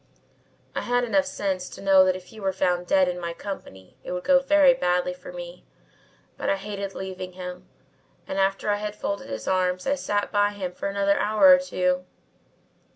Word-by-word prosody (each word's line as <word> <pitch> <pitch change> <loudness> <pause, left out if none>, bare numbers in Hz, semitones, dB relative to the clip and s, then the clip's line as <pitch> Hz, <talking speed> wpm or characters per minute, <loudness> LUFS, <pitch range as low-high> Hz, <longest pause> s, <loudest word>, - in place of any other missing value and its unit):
I - - -2
had 245 0 +1
enough 280 +4 +1
sense 190 -6 -3
to - - -11
know 195 -1 +6
that 185 -1 +2
if 185 -1 -9
he 220 - -11
were 195 -2 0
found 180 -1 0
dead 190 0 +4
in 180 0 -2
my 170 0 -3
company 130 - -9
it - - -5
would 180 0 -4
go 275 -1 +5
very 280 0 +5
badly 180 0 0
with - - -9
me, - - -8 0.7
but - - -2
I - - +3
hated 200 0 -6
leaving 185 -1 -6
him 180 0 -8 0.6
and 195 - -3
after 195 +2 +1
I 205 - +1
had 210 0 -4
folded 200 - -4
his 110 -1 -6
arms 185 -1 0
I 275 - +2
sat 205 -7 -1
by 205 0 +2
him 190 -3 -4
for 190 - -4
another 200 0 +1
hour 215 +7 +5
or 275 - +6
two. 180 -9 0
195 Hz, 200 wpm, -25 LUFS, 180-210 Hz, 0.7 s, know